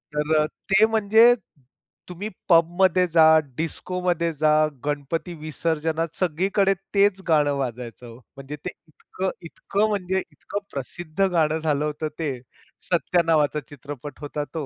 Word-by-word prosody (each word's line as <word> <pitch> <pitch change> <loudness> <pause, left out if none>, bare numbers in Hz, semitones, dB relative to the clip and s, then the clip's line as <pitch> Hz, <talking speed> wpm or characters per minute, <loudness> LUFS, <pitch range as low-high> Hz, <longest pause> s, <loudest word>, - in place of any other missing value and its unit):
तर 150 +1 +1
अ, - - +2 0.2
ते 195 +3 +6
म्हणजे, 220 +2 +5 0.8
तुम्ही 185 +4 -5 0.2
पबमध्ये 175 +2 +4
जा, 165 -1 +5 0.3
डिस्कोमध्ये 175 +1 -1
जा, 155 +1 +2 0.3
गणपती 150 +4 -3
विसर्जनात 160 +1 -2
सगळीकडे 190 +3 +2 0.2
तेच 200 -1 +3
गाणं 150 -3 +3
वाजायचं 125 -2 -5
हो. 115 0 -11 0.2
म्हणजे 135 +2 -7
ते - - -1 0.2
इतकं, 185 +4 -5 0.2
इतकं 200 +5 -1
म्हणजे 190 -2 -1
इतकं 205 - -6
प्रसिद्ध 165 +7 -2
गाणं 160 -2 +2
झालं 150 -2 0
होतं 150 +1 -3
ते. 160 -3 -1 0.6
सत्या 175 +1 +2
नावाचा 150 -2 +2
चित्रपट 145 -1 -9
होता 145 0 -4
तो. 160 -3 -3
165 Hz, 130 wpm, -24 LUFS, 150-185 Hz, 0.8 s, ते